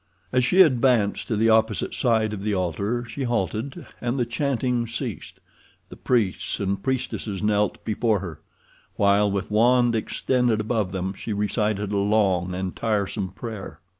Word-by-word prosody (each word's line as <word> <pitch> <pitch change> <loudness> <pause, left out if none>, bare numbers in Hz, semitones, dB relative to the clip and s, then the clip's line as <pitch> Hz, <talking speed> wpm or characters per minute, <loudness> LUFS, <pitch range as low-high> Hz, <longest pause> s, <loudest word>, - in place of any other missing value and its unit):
As 125 0 +2
she 185 +10 +7
advanced 125 - +2
to 115 - -1
the 110 +2 +3
opposite 110 -1 +2
side 110 -3 +1
of 100 - -5
the 105 0 -1
altar 100 +7 -1
she 140 - -7
halted, 120 - -2 0.2
and 120 +2 -1
the 125 - +1
chanting 125 -1 -1
ceased. 115 - -5 0.5
The - - -10
priests 110 -7 0
and 100 -1 -1
priestesses 120 -5 -3
knelt 105 -1 0
before 110 0 +1
her, 85 -5 -7 0.6
while 100 +1 +3
with 100 +1 -3
wand 120 +2 +4
extended 120 +1 0
above 110 -3 -1
them 95 0 -3
she 105 +2 -5
recited 105 0 -1
a 100 - 0
long 95 -3 +1
and 95 0 -4
tiresome 105 -3 -1
prayer. 105 +1 -8
110 Hz, 155 wpm, -24 LUFS, 100-120 Hz, 0.6 s, she